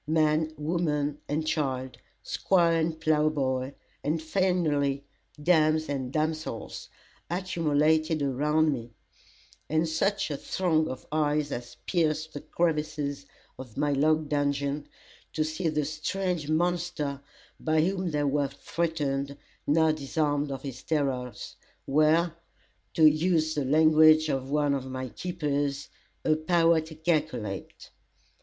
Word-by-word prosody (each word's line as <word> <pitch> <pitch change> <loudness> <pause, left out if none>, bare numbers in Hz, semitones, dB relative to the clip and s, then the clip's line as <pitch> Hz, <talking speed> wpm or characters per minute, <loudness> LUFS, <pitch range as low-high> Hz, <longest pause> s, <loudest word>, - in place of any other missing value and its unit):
Man, 155 0 +2
woman 150 -2 -1
and 155 +2 -1
child, 135 -4 -2 0.2
Squire 175 -3 +2
and 160 0 -1
ploughboy, 145 -4 +1 0.3
and, 155 +3 0
finally, 155 -5 0 0.3
dames 155 -1 +3
and 130 -3 -3
damsels, 155 -6 -3 0.4
accumulated 160 -3 +1
around 150 +3 +2
me, 120 -2 -6 0.8
and 160 +1 +2
such 160 +3 0
a 145 - -2
throng 160 -3 0
of 130 - -7
eyes 150 -1 +1
as 120 0 -6
pierced 160 -3 0
the 145 - -6
crevices 150 -4 -1 0.3
of 125 -4 -10
my 145 +1 +1
log 155 +2 +2
dungeon, 145 0 -1 0.5
to 155 - +1
see 155 +3 -2
the 150 -2 0
strange 160 +1 -2
monster 170 -4 -1 0.4
by 155 0 +2
whom 185 +1 0
they 150 -2 0
were 145 0 +1
threatened, 140 -2 -2 0.3
now 160 +2 +4
disarmed 145 0 -1
of 135 -1 -5
his 130 -3 -6
terrors, 130 -7 -2 0.3
were, 155 +4 +3 0.6
to 160 - +5
use 155 +1 +3
the 145 -3 -1
language 155 +2 +6
of 135 -1 -2
one 145 0 +2
of 135 -1 -3
my 130 0 -5
keepers 145 -4 -2 0.4
"a 155 - +4
power 165 +1 +3
to 160 0 -10
calkilate." 150 - -2
155 Hz, 120 wpm, -28 LUFS, 140-160 Hz, 0.8 s, language